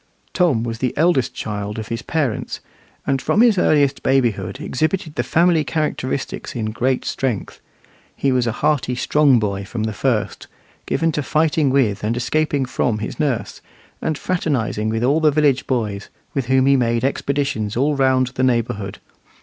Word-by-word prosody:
Tom 155 -11 +2
was 115 -1 -4
the 125 0 -2
eldest 160 -5 +2
child 105 0 -4
of 110 -1 -6
his 115 +1 -3
parents, 145 -5 -2 0.5
and 135 -2 0
from 215 - +2
his 230 -6 +5
earliest 145 -5 +2
babyhood 115 -8 0
exhibited 155 +4 -2
the - - -1
family 170 -1 +3
characteristics 150 -5 -3
in 110 -2 -2
great 125 +3 0
strength. 125 -8 -3 0.5
He 135 - +1
was 125 -2 +1
a - - +1
hearty, 130 -1 0
strong 140 +1 +3
boy 100 -3 -1
from 110 +3 -4
the 110 0 -2
first, 115 -1 -1 0.4
given 165 0 +1
to 150 - -1
fighting 155 0 +1
with 125 -8 +1
and 115 +3 0
escaping 145 +2 0
from 120 -3 -1
his 110 - -5
nurse, 140 -7 -2 0.4
and 155 - -1
fraternizing 130 -13 -1
with 110 +1 -1
all 140 +5 +3
the 155 -1 +4
village 145 -3 +2
boys, 105 -6 -2 0.2
with 135 -4 -2
whom 130 0 +3
he 140 0 +5
made 120 -2 +1
expeditions 135 -6 -1
all 145 +3 +2
round 130 -2 +2
the 125 - -4
neighbourhood. 115 -5 0
130 Hz, 165 wpm, -20 LUFS, 115-150 Hz, 0.5 s, his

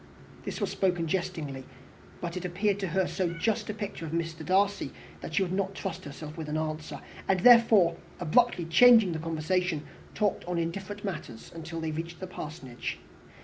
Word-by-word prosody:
This - - -4
was - - -1
spoken 180 -3 +1
jestingly, 160 -7 -2 0.6
but 170 0 -4
it 180 - -4
appeared 195 +3 0
to 195 - -1
her 185 +2 +1
so 175 -3 -1
just 210 +7 -1
a - - -1
picture 205 -5 -5
of 160 - -5
Mr. 165 0 -2
Darcy, 195 -4 +2 0.3
that 155 - -5
she 195 - +4
would 180 - -3
not 195 0 -1
trust 195 -4 -5
herself 150 +2 -8
with 155 -2 -5
an 155 - -1
answer; 155 -2 -4 0.3
and, 190 -2 +2
therefore, 225 -8 +7 0.2
abruptly 180 +2 +3
changing 225 +3 +7
the 160 - -2
conversation, 165 0 -1 0.3
talked 205 -2 +1
on 175 0 -2
indifferent 190 +5 -3
matters 155 - -6
till 165 +1 -5
they 160 -1 -2
reached 165 +2 -5
the 185 - -4
Parsonage. 150 -8 -6
175 Hz, 180 wpm, -29 LUFS, 160-195 Hz, 0.6 s, therefore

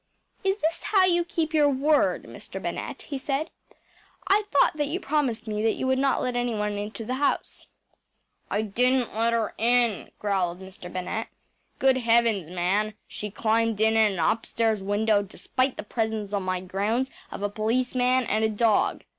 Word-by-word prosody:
“Is 390 +1 +1
this 330 +2 0
how 395 -3 +3
you 345 -1 +3
keep 330 -2 -2
your 295 -2 +5
word, 285 +3 +2
Mr. - - -9
Bennett?‚ÄĚ - - -5
he 280 -3 -5
said. 275 +4 -2 0.8
“I 410 +2 +3
thought 285 - +3
that 295 -1 0
you 330 +6 -2
promised 275 - -1
me 210 -1 -2
that 225 0 +2
you - - -3
would 260 0 +2
not 275 0 +2
let 250 -1 -1
anyone 225 -4 -1
into 210 +2 -6
the 250 - -2
house.‚ÄĚ 285 - -3 0.5
“I 210 - 0
didn’t 250 +4 +1
let 230 +2 +1
her 230 -1 0
in,‚ÄĚ 235 -2 +2
growled 185 -4 -1
Mr. 190 -1 -10
Bennett. 185 +5 -3 0.5
“Good 265 -1 +3
heavens, 230 -7 +2
man, 195 +4 0
she 210 - -5
climbed 225 +1 +1
in 220 0 +3
at 220 -2 +4
an - - -5
upstairs 225 +1 +1
window, 205 +1 +2
despite 255 +6 -2
the - - -4
presence 220 -1 -2
on 200 - 0
my 185 -1 -2
grounds 210 +8 -1 0.2
of - - -7
a 205 - +1
policeman 250 +4 +1
and 215 -1 0
a 220 - +3
dog! 220 0 +1
225 Hz, 175 wpm, -26 LUFS, 210-260 Hz, 0.8 s, your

